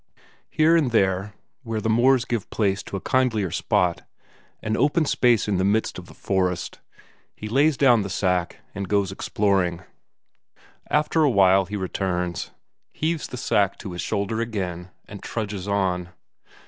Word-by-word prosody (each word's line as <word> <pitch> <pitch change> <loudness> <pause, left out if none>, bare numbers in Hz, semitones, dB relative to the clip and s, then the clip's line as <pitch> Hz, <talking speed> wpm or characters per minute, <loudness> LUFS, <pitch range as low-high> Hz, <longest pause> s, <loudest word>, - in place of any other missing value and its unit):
Here 160 +2 +3
and 155 -6 +3
there, 100 -2 +1 0.3
where 115 -4 -3
the 110 - -3
moors 120 +3 +3
give 120 -5 -3
place 100 -3 0
to 100 - -6
a - - -8
kindlier 110 -8 +1
spot, 90 -2 0 0.6
an 110 0 -1
open 155 +5 +2
space 120 -6 +2
in 100 -3 +1
the 95 - +1
midst 105 +3 0
of - - -12
the - - -15
forest, 90 -2 -2 0.6
he 105 - -7
lays 140 +6 +2
down 125 -5 +5
the 100 - -4
sack 90 -2 -1
and 100 -2 -5
goes 100 -2 +1
exploring; 95 -3 0 1.1
after 150 +2 +2
a 150 - +4
while 95 -4 +4
he 105 - -6
returns, 90 -2 -2 0.4
heaves 160 0 -2
the 125 - -7
sack 100 -5 +1
to 95 - -7
his 90 - -5
shoulder 110 +2 -2
again, 95 -6 -4 0.2
and 100 -1 -10
trudges 105 -4 -4
on. 95 -3 -1
100 Hz, 160 wpm, -24 LUFS, 95-120 Hz, 1.1 s, down